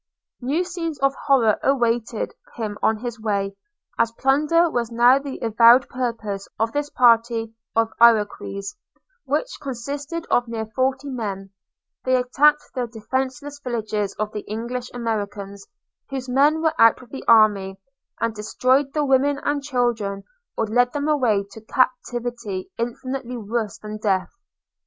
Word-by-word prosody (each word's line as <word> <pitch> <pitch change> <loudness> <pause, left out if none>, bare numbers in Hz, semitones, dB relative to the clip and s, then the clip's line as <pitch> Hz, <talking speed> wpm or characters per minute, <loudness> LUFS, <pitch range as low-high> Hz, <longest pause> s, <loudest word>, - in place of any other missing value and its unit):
New 285 +8 0
scenes 340 -4 -4
of 275 0 +3
horror 240 -8 +2
awaited 235 -4 0 0.2
him 215 -3 -4
on 220 - +2
his 240 0 -6
way. 200 -2 -1 0.4
As 230 - +3
plunder 300 +7 +3
was 240 -6 -2
now 240 +3 +5
the 275 -1 -6
avowed 235 +3 +6
purpose 225 -6 -3
of 225 +2 0
this 290 +2 -2
party 230 -2 +3 0.2
of 225 0 +2
Iroquois, 210 -3 +3 0.5
which - - -2
consisted 280 +5 -5
of 245 0 +3
near 225 -1 -3
forty 260 +5 -1
men, 200 -7 -5 0.5
they 255 0 +2
attacked 285 +4 +3
the 250 -2 -2
defenceless 260 +5 -4
villages 215 -4 -2
of 215 0 -2
the 210 - -5
English 240 +3 -4
Americans, 205 -4 -4 0.4
whose 265 -1 -4
men 290 +5 +3
were 320 -1 +3
out 230 0 +6
with 245 -2 -16
the 270 - -7
army; 205 -4 +4 0.4
and 230 -1 0
destroyed 255 +6 +1
the 300 -1 +1
women 275 +1 +3
and 290 0 0
children, 240 -8 -1 0.3
or 225 - +1
led 245 +3 +2
them 290 0 -2
away 240 -10 +2
to 220 - -11
captivity 240 -4 -2
infinitely 250 +1 -4
worse 220 -1 -3
than 215 0 -7
death. 195 -3 0
240 Hz, 140 wpm, -22 LUFS, 215-270 Hz, 0.5 s, avowed